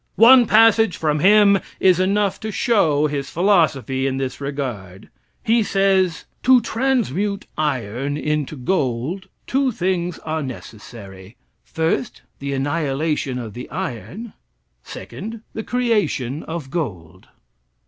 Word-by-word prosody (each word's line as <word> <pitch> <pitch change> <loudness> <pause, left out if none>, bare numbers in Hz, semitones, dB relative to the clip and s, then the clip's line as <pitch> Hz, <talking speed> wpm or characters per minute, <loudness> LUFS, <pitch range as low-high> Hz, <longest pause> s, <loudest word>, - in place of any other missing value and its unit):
One 240 +1 +7
passage 225 -1 +4
from 150 -1 0
him 200 +2 +5 0.2
is 185 -2 +4
enough 195 +1 +1
to 220 0 -5
show 185 - +2
his 140 -2 -3
philosophy 150 - +1
in 135 -1 -2
this 135 0 -4
regard. 120 -9 -5 0.3
He 230 0 +3
says: 195 -4 +1 0.2
"To 255 0 +6
transmute 215 - -1
iron 135 -1 -2
into 150 0 -2
gold 140 +4 -2 0.2
two 270 0 +1
things 180 -4 -2
are 160 0 -2
necessary. 105 -5 -10 0.3
First, 160 -5 -2 0.2
the 140 0 -4
annihilation 145 -1 -1
of 115 -4 -6
the 125 +1 -8
iron; 190 - -6 0.5
second, 220 +2 -8
the 220 - -4
creation 205 - -1
of 160 -5 -6
gold." 95 - -5
160 Hz, 120 wpm, -21 LUFS, 135-205 Hz, 0.5 s, One